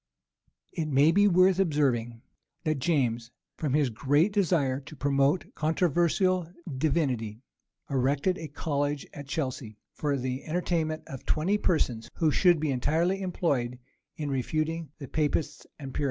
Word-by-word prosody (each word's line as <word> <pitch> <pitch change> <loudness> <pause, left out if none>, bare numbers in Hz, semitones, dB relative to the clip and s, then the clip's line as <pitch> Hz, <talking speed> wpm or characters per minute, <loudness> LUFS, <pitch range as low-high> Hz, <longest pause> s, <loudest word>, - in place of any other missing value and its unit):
It 160 -2 -2
may 145 +2 +4
be 205 +4 +5
worth 185 0 +4
observing, 125 -9 +1 0.4
that 155 -3 0
James, 120 -6 0 0.3
from 145 -3 -1
his 145 -5 +2
great 145 - +2
desire 160 -10 +2
to 150 +2 -12
promote 140 +4 +1
controversial 175 +2 +1 0.2
divinity, 130 -7 -1 0.4
erected 140 +6 +1
a 160 - -5
college 145 -1 -2
at 145 -1 -9
Chelsea 130 -7 -4 0.2
for 145 -2 -1
the 130 +1 -3
entertainment 160 -1 -1
of 135 - -8
twenty 185 +7 +1
persons, 125 - 0
who 160 -2 +2
should 175 +1 +4
be 150 -2 0
entirely 165 +9 +1
employed 140 -10 -1 0.4
in 150 -2 -3
refuting 155 +4 -2
the 140 - -8
Papists 150 +2 -1
and 135 -3 -8
Puritans. - - -3
150 Hz, 140 wpm, -28 LUFS, 135-165 Hz, 0.4 s, be